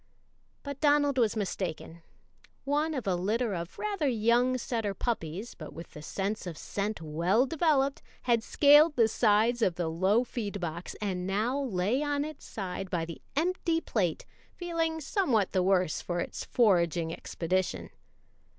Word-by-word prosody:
But 280 -1 -6
Donald 290 -2 +3
was 225 -3 +2
mistaken; 180 -5 -4 0.6
one 300 +3 0
of 260 - -3
a 190 - +1
litter 210 +5 0
of 170 -1 -5
rather 400 -8 -1
young 240 +2 +2
setter 225 -5 -2
puppies, 200 -2 -3
but 155 -3 -10
with 165 - -10
the 150 - -10
sense 195 +5 -3
of 165 -3 -6
scent 205 -3 -3
well 170 - +2
developed, 280 -2 +1 0.2
had 235 -2 +3
scaled 295 +5 +6
the 230 -3 +5
sides 225 +2 +2
of 185 -6 +2
the 175 -2 -1
low 190 +8 +2
feed 210 -5 -4
box, 170 0 -5
and 185 -3 -2
now 220 +8 0
lay 220 +1 0
on 290 -1 0
its 305 -1 -9
side 190 -2 -5
by 170 -2 -1
the 165 -1 -9
empty 335 +1 +1
plate, 185 - -1 0.3
feeling 330 -2 -1
somewhat 275 - +1
the 185 - +2
worse 185 -3 +2
for 175 -1 -3
its - - -4
foraging 170 -7 +2
expedition. 180 +2 -2
215 Hz, 155 wpm, -29 LUFS, 180-275 Hz, 0.6 s, scaled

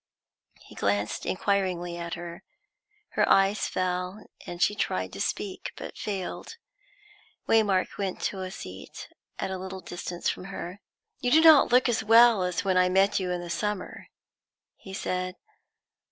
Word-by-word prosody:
He - - -15
glanced 100 +1 -1
inquiringly 185 -3 0
at 170 -1 -5
her. 170 0 -8 0.7
Her - - +1
eyes 195 +2 +4
fell, 180 +2 -2 0.2
and 175 - -6
she 210 - +3
tried 95 - -2
to 100 - -5
speak, 195 -2 -3
but - - -8
failed. 200 - -5 0.9
Waymark 205 -5 +2
went 195 -2 -2
to 190 - -2
a 185 - -4
seat 95 - -9 0.3
at 190 - -3
a 190 - -4
little 190 0 -6
distance 175 0 -5
from 180 - -2
her. 190 0 -7 0.4
"You 245 - 0
do 310 +5 +6
not 315 -6 +7
look 250 +1 +5
as 235 -2 0
well 225 -1 +7
as 180 +1 -1
when 190 -1 +2
I 180 0 +4
met 195 +2 +3
you 185 -1 -2
in 180 -1 -2
the 175 - -7
summer," 200 +3 -3 0.7
he 190 - -12
said. 185 -1 -2
185 Hz, 155 wpm, -27 LUFS, 175-200 Hz, 0.9 s, not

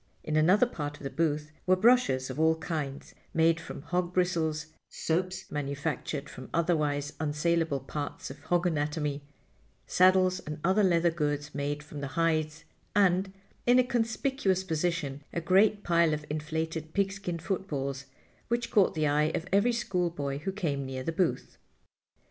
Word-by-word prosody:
In 155 - -2
another 180 +10 +5
part 145 -10 -5
of - - -14
the 135 - -4
booth 155 -2 -1 0.2
were 185 - +6
brushes 185 - +3
of 130 - -6
all 160 0 +4
kinds 150 -4 -5 0.2
made 165 0 +4
from 160 -3 -8
hog 180 0 -2
bristles, 165 -4 +1 0.2
soaps 185 +3 -2
manufactured 145 0 -3
from 130 - -10
otherwise 150 -4 +1
unsalable 155 -1 0
parts 145 0 -5
of 140 - -11
hog 175 0 +1
anatomy, 150 -3 -1 0.6
saddles 185 0 +4
and 150 -3 -6
other 190 +4 +3
leather 170 -2 +3
goods 145 -2 -2
made 145 +1 -2
from 150 -1 -8
the 140 +3 -6
hides, 155 -1 +1 0.3
and—in 195 +5 +1
a 255 - +6
conspicuous 230 -4 0
position—a 160 -3 -2
great 200 +4 +3
pile 170 -2 +3
of 150 0 -8
inflated 160 +1 -3
pigskin 195 -3 -1
footballs, 145 -7 -3 0.4
which 235 0 -1
caught 205 -7 +4
the 155 -1 +1
eye 150 +1 +3
of 165 - -2
every 200 +5 +4
schoolboy 175 -11 -1
who 175 +6 -3
came 155 -9 -2
near 130 -1 -5
the 165 - -1
booth. 170 0 -1
160 Hz, 150 wpm, -29 LUFS, 150-185 Hz, 0.6 s, were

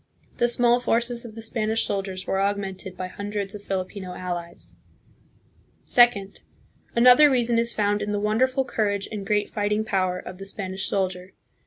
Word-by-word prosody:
The 240 - +3
small 240 0 +5
forces 240 0 0
of 220 -2 -10
the 225 - -7
Spanish 225 0 0
soldiers 195 -2 -3
were 195 - 0
augmented 195 -2 -3
by 185 - -4
hun 205 +3 -7
dreds 205 -2 -3
of 205 -1 -9
Filipino 190 -1 -4
allies. 175 -1 -6 1.1
Second. 225 -6 +3 0.5
Another 250 +5 +7
reason 240 -3 +2
is 235 0 +1
found 205 -1 0
in 205 0 -2
the 205 - -1
wonderful 255 +6 +1
courage 205 -5 -1
and 200 -2 -5
great 210 -1 +1
fighting 210 +1 -1
power 185 -3 0
of 180 0 -9
the 195 - -7
Spanish 190 -1 -3
soldier. 185 -1 -2
205 Hz, 165 wpm, -24 LUFS, 190-230 Hz, 1.1 s, Another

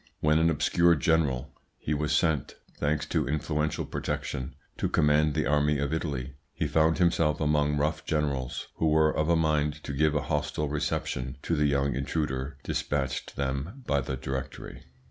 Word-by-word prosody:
When, 75 +1 +3
an 80 +1 +4
obscure 85 +1 +3
general, 70 -5 +1 0.3
he 75 - -2
was 75 0 -1
sent, 80 -6 +1 0.2
thanks 75 0 0
to 75 - 0
influential 75 +1 -1
protection, 65 -1 -4 0.2
to - - 0
command 75 0 +3
the 75 -3 +1
army 75 +2 +2
of 70 +2 -1
Italy, 70 -5 -3 0.2
he - - -1
found 80 0 +3
himself 85 -4 +2
among 75 -1 +2
rough 75 +2 0
generals 70 -5 -2
who 80 - +1
were 80 0 +3
of 75 +1 +1
a 85 - +5
mind 75 -2 +1
to 70 - -5
give 75 +2 +2
a 75 - +2
hostile 75 0 -1
reception 65 -3 -2
to 85 - 0
the 75 -1 +2
young 70 -2 +1
intruder 70 0 -2
dispatched 70 -2 -2
them 70 - -3
by 70 -8 +1
the 65 - -4
Directory. 65 +1 -6
75 Hz, 165 wpm, -28 LUFS, 70-75 Hz, 0.3 s, a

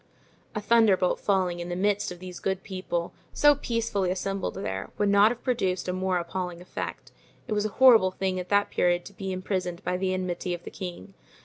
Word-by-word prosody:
A 210 - -1
thunderbolt 210 -4 +3
falling 185 -3 +1
in 175 0 -5
the 175 - -2
midst 200 +1 +1
of 180 - -7
these 180 0 -9
good 190 -1 -2
people, 185 -3 -3 0.2
so 295 0 +6
peacefully 230 -8 -1
assembled 195 +1 -2
there, 195 - -4
would 205 -1 +2
not 200 +1 +6
have 240 0 -5
produced 190 -9 0
a 180 - -1
more 185 0 0
appalling 175 0 -4
effect. 180 - -6 0.4
It 220 - -1
was 210 0 +1
a 205 - -12
horrible 235 -7 +7
thing 185 0 -2
at 180 - -6
that 205 0 +2
period 175 0 +1
to 200 - -10
be 190 0 -5
imprisoned 185 -1 -3
by 180 - -1
the 185 0 0
enmity 180 -1 -2
of 175 - -12
the - - -8
king. 185 +1 -7
190 Hz, 205 wpm, -27 LUFS, 180-205 Hz, 0.4 s, horrible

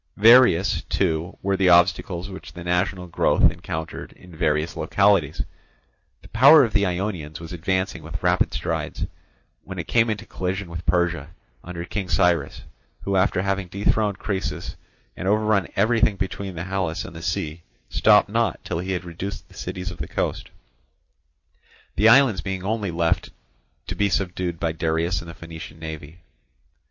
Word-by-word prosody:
Various, 115 -4 +6
too, 80 +2 -1
were 100 0 +1
the 95 -1 +3
obstacles 90 +1 +3
which 95 -1 -10
the 85 - -8
national 90 +1 0
growth 85 - +3
encountered 80 0 -6
in 90 -2 -15
various 75 +1 0
localities. 100 -7 +2 0.8
The - - -13
power 140 +6 +7
of 115 - -1
the 100 -2 +3
Ionians 90 -4 -3
was 80 +1 -8
advancing 95 +3 -1
with - - -7
rapid - - +2
strides, - - -3 0.6
when 95 0 -8
it 85 - -5
came 115 -1 +3
into 110 -2 -3
collision 95 0 -4
with 85 -1 -7
Persia, 85 -3 +1 0.3
under 85 -1 -6
King 95 -1 -4
Cyrus, 85 -2 +1 0.4
who, 100 - -2
after 95 0 +2
having 95 -1 -1
dethroned 100 +2 0
Croesus 100 -3 -4 0.4
and 95 - -5
overrun 105 -2 +2
everything 110 +1 +3
between 95 -1 -4
the 85 - -4
Halys 95 -2 -2
and - - -10
the 80 - -8
sea, 85 -1 -3 0.3
stopped 105 -1 +4
not 110 -3 0
till 80 - -2
he 95 +2 -3
had 90 0 -3
reduced 90 +4 -6
the - - -18
cities 90 0 -5
of 90 - -11
the - - -4
coast; - - -3 1.5
the 110 - +5
islands 120 -5 +5
being 95 -2 -4
only 105 0 -1
left 85 -1 0 0.6
to - - -4
be 100 0 +1
subdued 90 -2 -2
by 85 -2 0
Darius 80 +2 -1
and 85 - -10
the 85 - -9
Phoenician 80 -1 -10
navy. 80 +1 -8
90 Hz, 160 wpm, -23 LUFS, 85-100 Hz, 1.5 s, power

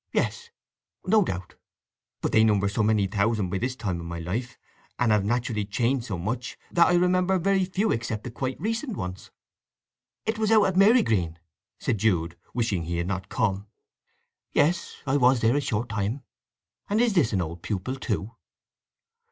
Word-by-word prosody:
Yes, 470 0 -1 0.6
no 210 +2 +4
doubt; 90 - -5 0.7
but - - -1
they 110 - +5
number 105 -2 +3
so 100 +3 -1
many 105 -1 +3
thousands 100 -1 0
by 95 - -1
this 125 +3 -2
time 95 -8 -3
of 85 - -7
my 85 0 -5
life, 110 +9 -4 0.4
and 120 -3 +2
have 105 -2 +3
naturally 115 0 0
changed 120 +4 0
so 100 - -3
much, 115 +8 -4
that 170 -1 +5
I - - +3
remember 180 +1 +3
very 190 +1 +2
few 195 +4 0
except 115 -2 -2
the 125 - -6
quite 130 +2 -4
recent 225 +3 -2
ones." 90 -1 -6 1.0
"It 220 0 -1
was 215 -1 +1
out 215 -2 +6
at 190 - 0
Marygreen," 185 - +4 0.4
said 110 - -1
Jude, 85 -5 +1 0.2
wishing 110 -9 -1
he 85 +1 -2
had 85 - -1
not 95 0 -4
come. 105 -4 -1 0.9
"Yes. 170 +4 +1
I 135 +1 +2
was 125 -2 +4
there 115 +3 +3
a 145 - +2
short 120 -3 -2
time. 110 +5 -2 0.7
And 210 +2 +2
is 235 -2 +3
this 160 - +3
an 100 - +1
old 85 +1 -7
pupil, 105 +5 -3
too?" 110 -5 -3
115 Hz, 175 wpm, -26 LUFS, -, 1.0 s, out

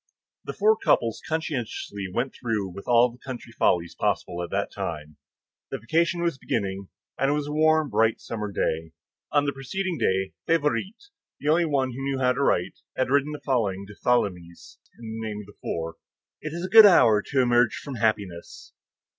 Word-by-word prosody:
The - - -4
four 215 +1 +4
couples 115 - +1
conscientiously 125 -10 -3
went 120 +7 -2
through 110 -5 -2
with 100 +2 -10
all 120 0 +5
the 120 - -17
country 125 -3 -8
follies 85 -6 +1
possible 90 -3 -1
at 85 - -6
that - - -2
time. 75 -2 -6 0.5
The - - -3
vacation 170 +8 0
was 170 -6 -1
beginning, 100 -5 -3 0.3
and 135 - +2
it - - +2
was 150 -1 -2
a 145 - -5
warm, 155 0 +3
bright, 115 0 +2
summer 105 -3 -5
day. 80 -3 -2 0.4
On 145 -1 +3
the 140 - -1
preceding 175 +6 -3
day, 95 0 0
Favourite, 165 - 0 0.4
the 145 - -2
only 170 +2 +4
one 135 -4 0
who 130 +3 -7
knew 135 0 -1
how 125 -1 +2
to 135 - -3
write, 90 -8 +1 0.2
had 130 0 0
written 145 +1 +2
the 150 - -7
following 100 -8 0
to 105 - -12
Tholomyès 90 -8 -2 0.2
in 120 - -11
the 110 - -4
name 105 -1 -5
of - - -12
the 105 - -18
four: 80 0 -4 0.4
"It 155 - -5
is 170 +3 -4
a - - -2
good 215 +2 +10
hour 120 - +6
to 135 - -2
emerge 120 -1 +3
from 140 -4 -7
happiness." 100 -6 -2
120 Hz, 190 wpm, -25 LUFS, 100-150 Hz, 0.5 s, good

